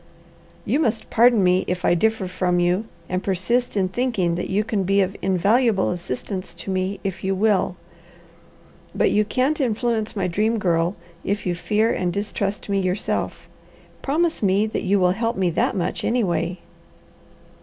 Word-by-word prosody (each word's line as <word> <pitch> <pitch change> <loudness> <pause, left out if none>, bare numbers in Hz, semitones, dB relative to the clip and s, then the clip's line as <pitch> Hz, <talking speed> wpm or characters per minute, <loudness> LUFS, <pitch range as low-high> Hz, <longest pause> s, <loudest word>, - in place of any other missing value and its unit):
"You 290 - +1
must 225 -7 -1
pardon 235 -3 +5
me 180 +1 +3
if 180 0 -2
I - - +4
differ 220 +2 +1
from 180 -1 0
you, 180 +5 +1 0.2
and 185 0 -2
persist 210 +5 0
in 190 -1 +2
thinking 190 -4 0
that 175 +1 -3
you 200 +2 +1
can 210 -2 -1
be 195 +2 +2
of 195 +1 -1
invaluable 200 +3 +2
assistance 180 +3 -5
to 195 - -6
me, 190 +1 -1
if 195 -2 -4
you 190 0 0
will. 195 -2 +2 1.2
But - - +2
you 210 - +3
can't 260 +8 0
influence 230 -2 0
my 195 -3 -1
Dream 215 +6 +1
Girl, 175 -2 +1 0.3
if 200 +1 -2
you 180 - 0
fear 215 +5 +1
and 180 -1 -1
distrust 200 +1 -3
me 200 -1 +1
yourself. 185 +2 -2 0.5
Promise 325 +4 0
me 200 +1 +3
that 220 - -3
you 200 0 +2
will 180 -1 +4
help 230 +4 -1
me 185 -2 +1
that - - 0
much, 180 - -2
anyway." 180 -7 0
195 Hz, 165 wpm, -22 LUFS, 185-220 Hz, 1.2 s, pardon